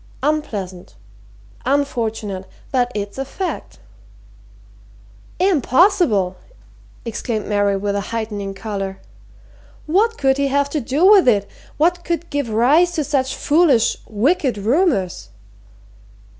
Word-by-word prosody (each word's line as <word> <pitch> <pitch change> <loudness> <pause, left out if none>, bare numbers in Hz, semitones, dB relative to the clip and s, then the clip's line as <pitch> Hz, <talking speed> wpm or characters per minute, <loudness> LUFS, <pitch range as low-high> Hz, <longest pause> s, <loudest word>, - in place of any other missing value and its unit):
"Unpleasant 205 - -3 0.7
unfortunate 225 -8 -2 0.2
but 250 -2 +1
it's 205 +3 -4
a - - 0
fact." 365 +7 -5 1.6
"Impossible!" 310 - +2 0.7
exclaimed 225 -1 -3
Mary 205 -1 +1
with 200 +1 -2
a 200 - 0
heightening 210 -3 -4
colour. 195 -2 -4 0.9
"What 425 +8 +2
could 270 -1 +2
he 280 - +2
have 280 +1 0
to 300 - -1
do 275 +8 +1
with 390 -6 +7
it? 205 -4 +3 0.3
What 350 +3 +2
could 340 0 -3
give 285 -5 -2
rise 285 +11 +3
to 315 -3 -1
such 270 -2 -1
foolish 290 -7 +3
wicked 255 - +1
rumours?" 205 - 0
255 Hz, 110 wpm, -19 LUFS, 205-305 Hz, 1.6 s, with